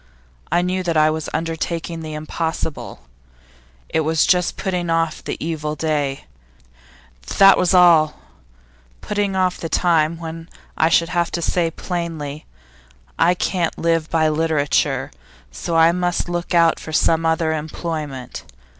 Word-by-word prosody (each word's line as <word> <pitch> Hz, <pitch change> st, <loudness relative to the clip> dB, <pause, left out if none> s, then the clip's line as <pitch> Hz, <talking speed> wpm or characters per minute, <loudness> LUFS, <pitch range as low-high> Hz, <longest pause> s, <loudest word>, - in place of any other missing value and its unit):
I 175 Hz, -, +2 dB
knew 185 Hz, +1 st, -1 dB
that 170 Hz, -3 st, -1 dB
I 155 Hz, 0 st, +4 dB
was 155 Hz, 0 st, -4 dB
undertaking 165 Hz, +1 st, -3 dB
the 155 Hz, -1 st, -6 dB
impossible. 160 Hz, 0 st, -4 dB, 0.8 s
It -, -, -1 dB
was 160 Hz, 0 st, +2 dB
just 180 Hz, -1 st, +2 dB
putting 180 Hz, -3 st, -2 dB
off 165 Hz, -1 st, 0 dB
the -, -, -4 dB
evil 155 Hz, -1 st, -3 dB
day, 145 Hz, -4 st, -2 dB, 1.1 s
that 195 Hz, 0 st, +8 dB
was 185 Hz, +1 st, +2 dB
all 165 Hz, -4 st, +5 dB, 0.8 s
putting 205 Hz, -2 st, -1 dB
off 185 Hz, -1 st, 0 dB
the 165 Hz, -, -5 dB
time 165 Hz, -2 st, +2 dB
when 165 Hz, 0 st, -8 dB, 0.3 s
I 160 Hz, -, +3 dB
should 165 Hz, 0 st, +3 dB
have 175 Hz, -1 st, 0 dB
to 170 Hz, -, -1 dB
say 170 Hz, -1 st, +1 dB
plainly: 165 Hz, -4 st, -5 dB, 0.7 s
"I 175 Hz, +2 st, +4 dB
can't 175 Hz, -2 st, -1 dB
live 165 Hz, -1 st, 0 dB
by 160 Hz, -1 st, +2 dB
literature, 155 Hz, -2 st, 0 dB, 0.4 s
so 115 Hz, -, -4 dB
I 165 Hz, +1 st, +6 dB
must 175 Hz, 0 st, -1 dB
look 175 Hz, +1 st, -3 dB
out 165 Hz, -1 st, +4 dB
for 155 Hz, -, -8 dB
some 165 Hz, +1 st, +2 dB
other 160 Hz, 0 st, +1 dB
employment." 150 Hz, -4 st, -5 dB
165 Hz, 140 wpm, -20 LUFS, 155-175 Hz, 1.1 s, that